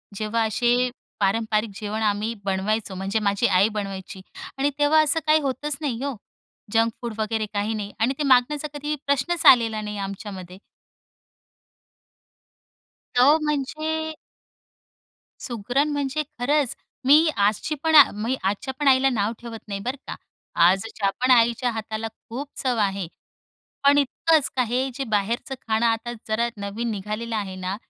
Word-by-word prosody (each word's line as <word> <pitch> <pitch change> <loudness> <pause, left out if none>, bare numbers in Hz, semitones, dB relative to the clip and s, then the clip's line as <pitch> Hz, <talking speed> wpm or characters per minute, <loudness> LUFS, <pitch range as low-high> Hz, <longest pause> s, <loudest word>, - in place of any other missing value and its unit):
जेव्हा 215 +2 -1
असे 240 +3 +2 0.3
पारंपारिक 215 +2 +1
जेवण 215 +1 -4
आम्ही 210 +2 0
बनवायचो 195 +1 -1
म्हणजे 195 +3 -1
माझी 200 +2 +1
आई 190 +4 +4
बनवायची 195 -2 -5 0.4
आणि 280 +1 +2
तेव्हा 305 +2 +5
असं 305 +2 +2
काही 310 +1 +5
होतंच 275 +1 -2
नाही 255 -5 -2
हो. 280 -3 -2 0.6
जंक 225 0 +3
फूड 235 -2 -4
वगैरे 220 0 -1
काही 205 +2 -1
नाही 205 -1 -4
आणि 245 +5 +2
ते 300 - -1
मागण्याचा 275 +3 +3
कधी 295 +1 -3
प्रश्नच 285 +5 0
आलेला 225 -3 +6
नाही 210 0 -5
आमच्यामध्ये. 195 -2 -7 2.6
तो 280 +6 +6
म्हणजे 310 +2 -2 1.3
सुगरण 245 +5 -1
म्हणजे 285 +1 -1 0.2
खरंच, 280 +1 +1 0.3
मी 305 +4 +6
आजची 210 +9 +1
पण 320 -1 +3 0.3
मी 255 +3 0
आजच्या 205 +7 -2
पण 290 - 0
आईला 265 0 +5
नाव 215 -3 0
ठेवत 230 -2 -8
नाही 200 -1 -4
बरं 260 +3 -2
का, - - -5 0.5
आजच्या 195 +1 0
पण 255 0 +3
आईच्या 235 +1 +4
हाताला 220 0 -4 0.2
खूप 270 +5 -5
चव 250 -3 0
आहे 195 -3 0 0.8
पण 285 +1 +6
इतकंच 290 +2 +2
आहे, 255 +2 +1
जे 270 - -3
बाहेरचं 225 +3 -1
खाणं 225 +1 +1
आता 230 +1 0
जरा 220 +2 +1
नवीन 210 +4 -3
निघालेलं 215 +3 -4
आहे 195 -3 -3
ना, 185 +1 -3
230 Hz, 140 wpm, -24 LUFS, 210-270 Hz, 2.6 s, आलेला